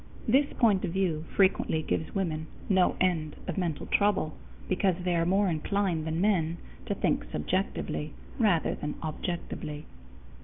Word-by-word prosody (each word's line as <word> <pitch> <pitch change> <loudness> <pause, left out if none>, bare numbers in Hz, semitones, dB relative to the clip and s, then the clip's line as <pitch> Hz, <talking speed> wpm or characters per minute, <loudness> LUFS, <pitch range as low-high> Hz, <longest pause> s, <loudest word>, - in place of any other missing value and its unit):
This 275 +5 +4
point 210 -6 +3
of 175 -4 -2
view 170 -5 0
frequently 185 -5 +3
gives 160 - -2
women 160 -5 -1 0.2
no 190 -2 +3
end 165 -5 +1
of 180 - -2
mental 170 -5 -2
trouble, 200 -7 +2 0.3
because 185 -1 +2
they 180 -1 +1
are 165 0 +2
more 195 +2 +3
inclined 170 0 0
than 160 +1 -1
men 175 -5 +2 0.3
to - - 0
think - - +1
subjectively 150 - -2 0.2
rather 200 -8 +3
than 150 0 -4
objectively. 155 -2 -4
175 Hz, 145 wpm, -29 LUFS, 155-195 Hz, 0.3 s, This